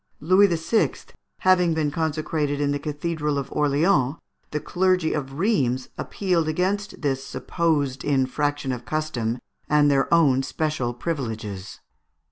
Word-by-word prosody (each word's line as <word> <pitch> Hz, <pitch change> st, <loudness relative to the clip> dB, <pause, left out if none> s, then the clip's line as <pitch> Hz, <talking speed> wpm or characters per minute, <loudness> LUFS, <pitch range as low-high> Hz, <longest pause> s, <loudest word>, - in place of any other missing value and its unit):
Louis 185 Hz, +6 st, +5 dB
VI. 170 Hz, +5 st, +1 dB, 0.5 s
having 180 Hz, -3 st, +4 dB
been 150 Hz, -2 st, 0 dB
consecrated 155 Hz, -2 st, -1 dB
in 145 Hz, -1 st, +1 dB
the 145 Hz, -, -1 dB
Cathedral 150 Hz, 0 st, -2 dB
of 140 Hz, -, -4 dB
Orleans, 150 Hz, -1 st, +2 dB, 0.3 s
the 150 Hz, -, -2 dB
clergy 180 Hz, +1 st, +1 dB
of 135 Hz, -3 st, -3 dB
Rheims 135 Hz, -, +1 dB
appealed 180 Hz, -5 st, -1 dB
against 190 Hz, +4 st, -1 dB
this 135 Hz, -2 st, 0 dB
supposed 145 Hz, -5 st, -1 dB
infraction 145 Hz, 0 st, 0 dB
of 125 Hz, -1 st, -4 dB
custom 125 Hz, -7 st, -2 dB, 0.3 s
and 150 Hz, -1 st, +4 dB
their 135 Hz, -1 st, +1 dB
own 145 Hz, -6 st, +5 dB
special 135 Hz, -3 st, -2 dB
privileges. 110 Hz, -, -5 dB
150 Hz, 125 wpm, -24 LUFS, 135-165 Hz, 0.5 s, Louis